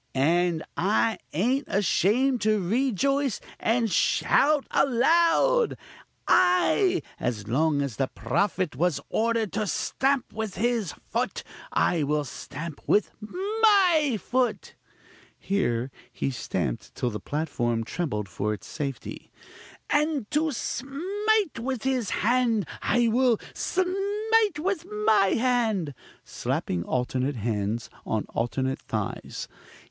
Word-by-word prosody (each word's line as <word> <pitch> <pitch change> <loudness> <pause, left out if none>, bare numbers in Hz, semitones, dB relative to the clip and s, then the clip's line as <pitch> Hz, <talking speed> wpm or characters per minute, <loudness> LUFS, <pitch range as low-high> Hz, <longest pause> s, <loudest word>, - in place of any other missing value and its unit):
_ - - -1
and 170 +3 +2
I 215 +4 +1
ain't 250 - 0
ashamed 220 +6 +2
to 215 0 +2
rejoice 265 +6 +1 0.2
and 225 -1 +1
shout 295 +8 +3
aloud. 335 - +3 0.5
Ay! 360 - +3 0.2
as 110 -4 -3
long 145 +4 +2
as 135 -6 -5
the 135 - +1
prophet 185 -3 -1
was 160 0 +1
ordered 225 -2 0
to 210 0 -1
stamp 270 +5 0
with 220 -2 -4
his 225 -4 0 0.2
foot, - - -1 0.3
I 170 -2 +2
will 150 +1 +1
stamp 145 +3 -7
with 210 - +3
my 370 - +3
foot; 245 -1 -1 0.6
(here 130 -11 -1 0.2
he 135 - -2
stamped 65 - -3
till 125 - -1
the 105 - -4
platform 120 -4 -1
trembled 110 - -3
for 105 +4 -2
its 100 - -14
safety) 140 -5 -6 0.6
and 295 -4 +1
to 310 +1 +1
smite 370 - -1
with 255 0 -3
his 260 -5 0
hand, 230 -3 +1
I 240 -1 +2
will 240 0 +3
smite 405 +2 +1
with 360 +2 -1 0.2
my 195 -3 +4
hand 225 - +1 0.3
(slapping 85 -1 -2
alternate 130 +2 -1
hands 110 0 -2
on 110 -2 -2
alternate 130 +3 -1
thighs.) - - -4
220 Hz, 115 wpm, -26 LUFS, -, 0.6 s, my